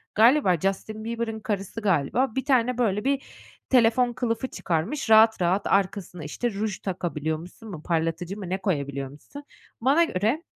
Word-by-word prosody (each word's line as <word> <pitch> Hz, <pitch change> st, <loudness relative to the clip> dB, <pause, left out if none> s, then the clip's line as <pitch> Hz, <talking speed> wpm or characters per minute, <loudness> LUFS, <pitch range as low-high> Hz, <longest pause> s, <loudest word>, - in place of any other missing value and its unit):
galiba 225 Hz, -, +5 dB
Justin 205 Hz, +4 st, -2 dB
Bieber'ın 230 Hz, -1 st, -3 dB
karısı 205 Hz, 0 st, -4 dB
galiba, 205 Hz, -, +1 dB
bir 265 Hz, -1 st, -2 dB
tane, 250 Hz, -3 st, +2 dB
böyle, 210 Hz, -4 st, +1 dB
bir 275 Hz, 0 st, +1 dB, 0.5 s
telefon 245 Hz, 0 st, +4 dB
kılıfı 235 Hz, 0 st, -2 dB
çıkarmış 195 Hz, -, -2 dB
rahat 220 Hz, -1 st, +6 dB
rahat 180 Hz, +3 st, +1 dB
arkasına 190 Hz, -3 st, 0 dB
işte 235 Hz, +11 st, -3 dB
ruj 205 Hz, 0 st, -3 dB
takabiliyormuşsun 170 Hz, +2 st, -4 dB
mu, 155 Hz, -4 st, -8 dB
parlatıcı 165 Hz, +3 st, -1 dB
mı, 190 Hz, -4 st, -6 dB
ne 190 Hz, -, 0 dB
koyabiliyor 140 Hz, -7 st, -2 dB
muşsun. 150 Hz, -, -12 dB, 0.4 s
Bana 280 Hz, +8 st, +4 dB
göre, 235 Hz, -, 0 dB
210 Hz, 150 wpm, -25 LUFS, 175-240 Hz, 0.5 s, rahat